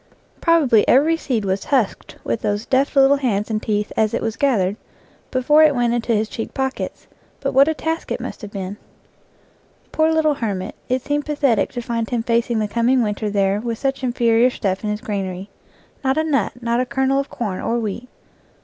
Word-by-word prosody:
Probably 295 - +4
every 300 +6 +4
seed 245 -9 -2
was 190 0 -1
husked 255 -8 -1
with - - -2
those 205 +2 -1
deft 270 +3 +1
little 275 +1 +5
hands 225 -6 -1
and 215 0 -1
teeth 210 -1 -2
as 215 -1 +1
it - - -1
was 225 -1 -2
gathered, 205 -9 +1 0.5
before 285 +4 +4
it 305 -2 +5
went 240 -1 +1
into 235 -1 0
his 215 +1 0
cheek 225 - -6
pockets, 265 0 -3 0.3
but - - -2
what 275 +2 +6
a 320 - +1
task 320 +1 -3
it - - -1
must - - -7
have 210 - -7
been! 195 0 -5 1.1
Poor 315 0 +2
little 315 -1 +3
hermit, 205 -7 -3 0.2
it 255 0 0
seemed 290 +1 -2
pathetic 285 -5 +1
to 245 - -3
find 230 -1 -2
him 240 -2 -1
facing 235 0 +1
the 215 -1 0
coming 235 +3 +2
winter 210 0 -2
there 200 0 +1
with 230 -1 -3
such 270 +1 -2
inferior 240 -1 +3
stuff 195 -5 -2
in 210 - -1
his 210 +1 -3
granary. 195 -2 -4 0.5
Not 265 +1 +1
a 315 - +2
nut, 280 -9 0
not 235 0 +1
a 255 - +1
kernel 265 +2 +1
of 275 - -3
corn 205 -6 -4
or 235 - 0
wheat. 235 +2 -4
235 Hz, 200 wpm, -20 LUFS, 210-270 Hz, 1.1 s, what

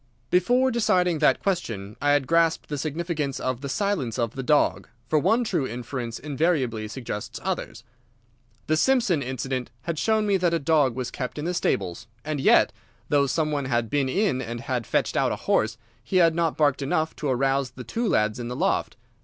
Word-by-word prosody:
"Before 245 +9 +3
deciding 180 -8 +2
that 150 - +4
question 115 - -2
I 145 0 +3
had 145 -2 +2
grasped 165 +2 +2
the 145 - -2
significance 155 -2 -2
of 130 -1 -2
the 140 - -5
silence 160 - -1
of 115 -2 -1
the 135 - -4
dog, 145 +3 +2 0.2
for 155 +6 +3
one 225 - +2
true 175 - -1
inference 120 0 -5
invariably 135 -7 0
suggests 110 -3 -6
others. - - -4 0.8
The 155 - +2
Simpson 230 - +2
incident 130 0 -3
had 160 +2 -3
shown 220 -1 +2
me 200 -2 +3
that 175 -2 +1
a - - +3
dog 145 -4 +2
was 130 -1 -4
kept 125 +1 -5
in 150 - -4
the 175 - -1
stables, 105 - -1 0.2
and 155 -1 -2
yet, - - +5 0.4
though 140 -1 +3
some 155 +3 0
one 145 -2 -1
had 120 -3 -1
been 140 -2 +1
in 155 -4 +1
and 120 -1 -5
had 125 -2 -3
fetched - - 0
out - - +2
a - - -1
horse, 110 +1 +1 0.3
he 155 - -5
had 165 -2 +5
not 165 -1 0
barked 145 -2 +2
enough 155 +3 0
to 150 - -3
arouse 135 +1 +1
the 125 0 -10
two 230 - -2
lads 110 -2 +1
in 120 - -4
the 125 - -4
loft. - - 0
145 Hz, 195 wpm, -25 LUFS, 125-170 Hz, 0.8 s, yet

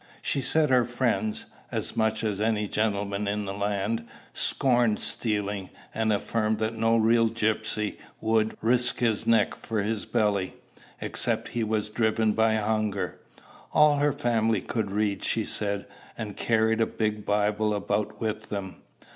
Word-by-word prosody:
She 140 - 0
said 155 +1 +2
her 125 -1 +5
friends 115 -3 -1 0.3
as - - -2
much 110 0 +1
as 105 -2 -1
any 105 -1 +1
gentleman 100 -1 -1
in 105 0 -1
the 95 - -4
land 105 +3 -2 0.3
scorned 120 -5 +2
stealing; 105 -4 -2 0.2
and 110 0 +1
affirmed 110 +1 0
that 110 +1 -1
no 115 +1 +2
real 115 +1 +4
gypsy 110 -1 -1 0.2
would 110 0 +1
"risk 120 +2 +3
his 115 -4 0
neck 115 -2 +4
for 110 -3 -3
his 110 0 -2
belly," 105 -4 0 0.5
except - - -1
he 120 - -2
were 110 0 +1
driven 110 +1 +1
by 110 +1 +2
hunger. 105 -3 -1 0.5
All 150 -1 +5
her 145 +1 +3
family 115 -5 +1
could 110 -4 -2
read, 100 0 -1
she 110 -2 0
said, 100 -1 -2 0.3
and 105 -2 -5
carried 110 0 +2
a 115 - +3
big 105 -1 -2
Bible 105 +1 +1
about 105 +1 -2
with 110 -1 -3
them. 95 -3 -5
110 Hz, 150 wpm, -27 LUFS, 105-115 Hz, 0.5 s, her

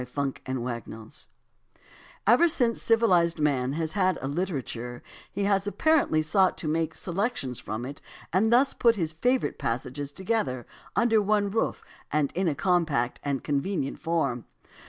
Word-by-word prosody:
AS 125 - -13
TO 140 -2 -1
ANTHOLOGIES 120 -3 -3
1 110 0 -10 1.1
Ever 245 +11 +6
since 245 -8 +1
civilized 185 -8 +3
man 135 -3 +1
has 160 0 -2
had 185 -2 +2
a 135 - -4
literature 135 -7 -4 0.3
he 200 - -2
has 200 0 +1
apparently 275 - +2
sought 185 +4 +3
to 160 - -4
make 160 0 0
selections 175 - -2
from 115 0 -5
it 140 +2 -8 0.3
and 215 +5 +3
thus 265 +3 +4
put 235 -1 +3
his 165 -5 -2
favorite 250 +10 0
passages 130 +4 -3
together 150 - -1 0.3
under 225 -2 +4
one 205 0 +1
roof 225 - -1 0.3
in 150 +5 0
a 155 - +1
compact 155 -7 +1
and 140 -2 -2
convenient 145 0 -1
form. 150 - -1
165 Hz, 150 wpm, -27 LUFS, 135-205 Hz, 1.1 s, Ever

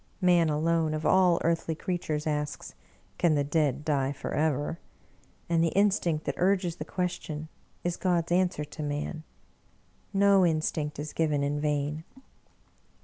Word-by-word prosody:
Man 175 -4 +4
alone, 160 +1 +1
of 155 0 -4
all 180 -1 +4
earthly 165 -1 0
creatures, 160 -4 -3
asks, 150 -1 -3 0.2
" - - -35
Can 165 -3 +3
the 145 - +2
dead 145 -1 0
die 140 -3 +1
forever? 145 +2 -1 0.3
" - - -34
and 165 -1 +2
the 165 - +2
instinct 185 -6 +2
that - - -1
urges 180 -2 +1
the - - -5
question 160 -4 -4 0.3
is 175 -1 -1
God's 175 -3 0
answer 175 -4 +1
to 150 +2 -9
man. 150 +2 -3 0.9
No 200 -1 +5
instinct 155 -2 0
is 150 +1 -5
given 150 -3 +1
in 145 +1 -1
vain. 150 +1 -1
160 Hz, 145 wpm, -28 LUFS, 150-175 Hz, 0.9 s, No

